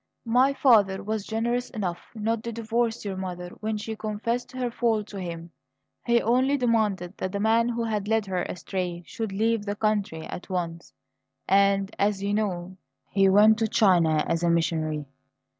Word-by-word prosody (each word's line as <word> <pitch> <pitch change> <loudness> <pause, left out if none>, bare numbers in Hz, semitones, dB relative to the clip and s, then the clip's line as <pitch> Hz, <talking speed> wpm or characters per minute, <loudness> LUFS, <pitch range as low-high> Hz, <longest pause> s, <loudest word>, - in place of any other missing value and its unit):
My 250 +4 +4
father 210 -9 +4
was 215 0 -3
generous 235 +3 -1
enough 185 -6 -4
not 220 +1 -1
to 235 - -3
divorce 230 0 -1
your 195 -2 -3
mother 180 -1 -5
when 215 0 -2
she 220 +1 -5
confessed 225 +3 -3
her 255 -2 -3
fall 230 -3 +1
to 205 -1 -9
him; 170 -2 -6 0.6
he 235 0 +4
only 255 +5 +2
demanded 210 -7 0
that 185 - -3
the 200 - -3
man 225 +3 +3
who 235 -1 -2
had 210 -3 -2
led 220 -1 +1
her 185 -2 -2
astray 180 -1 -4
should 220 +2 -5
leave 220 +2 +1
the 205 0 -3
country 205 -7 -1
at 180 - -8
once; 170 -2 -4 0.6
and, 195 +1 +3
as 200 -1 +1
you 200 +1 0
know, 190 -3 -2 0.3
he 195 -1 +4
went 215 +3 +6
to 225 - +2
China 175 -9 +3
as 165 - 0
a 170 - +2
missionary. 160 -3 0
210 Hz, 175 wpm, -26 LUFS, 185-225 Hz, 0.6 s, went